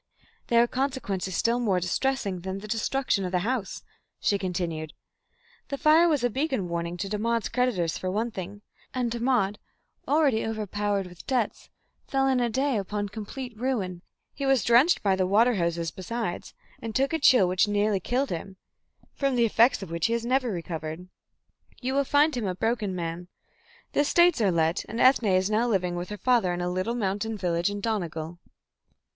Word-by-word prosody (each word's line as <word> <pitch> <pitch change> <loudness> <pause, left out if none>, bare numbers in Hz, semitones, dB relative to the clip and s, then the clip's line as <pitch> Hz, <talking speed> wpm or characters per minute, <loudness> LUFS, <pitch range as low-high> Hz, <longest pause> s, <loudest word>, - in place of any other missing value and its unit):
"There 235 0 +5
were - - +5
consequences 240 -9 -2
still 235 +1 +2
more 200 -7 +1
distressing 200 +1 -1
than 190 +2 -5
the 205 +2 -8
destruction 225 0 0
of 180 - -3
the 180 -1 +1
house," 240 -5 -2 0.4
she 200 - +1
continued. 170 -4 -3 0.7
"The 280 - -4
fire 325 +3 +5
was 295 -6 +1
a 245 - +3
beacon 265 - -1
warning 170 +1 -3
to 195 - -3
Dermod's 225 +3 -1
creditors 190 -10 0
for 185 - -3
one 220 +5 -1
thing, 200 +1 -7 0.3
and 245 -2 0
Dermod, 235 -4 0 0.5
already 280 -6 +3
overpowered 205 -2 -2
with 180 -1 -13
debts, 250 -6 -1 0.4
fell 270 0 +1
in 260 -1 +2
a 240 -1 +1
day 265 0 0
upon 205 +1 -3
complete 225 +4 -7
ruin. 210 -8 -2 0.3
He 280 - -6
was 270 -4 +3
drenched 250 +9 +4
by 195 -2 +3
the 185 -1 0
water 225 +6 +4
hoses 170 -4 -1
besides, 190 +1 -5 0.3
and 225 -1 -6
took 270 +4 +1
a 320 - +1
chill 250 -9 +6
which 185 +4 +2
nearly 205 -1 +1
killed 255 +8 -1
him, 190 +3 -5 0.6
from 275 -2 0
the 235 -1 +4
effects 230 +1 +3
of 175 - -9
which 170 +3 0
he 230 - -1
has 235 0 -1
never 255 0 +1
recovered. 165 -2 -5 0.7
You 260 0 -2
will 280 0 +2
find 290 +2 +3
him 230 -5 -2
a 185 - -2
broken 215 -2 -1
man. 170 0 -4 0.7
The - - 0
estates 345 0 +4
are 200 -3 +3
let, 165 +1 +1
and 225 - -6
Ethne 255 -3 +5
is 190 +1 +2
now 225 +3 +2
living 180 -5 0
with 175 +1 -5
her 210 - -5
father 235 -6 +2
in 175 - -3
a 175 0 -1
little 185 +6 -1
mountain 210 0 -2
village 175 -1 0
in 205 0 -5
Donegal." 170 -6 -3
210 Hz, 185 wpm, -26 LUFS, 185-250 Hz, 0.7 s, chill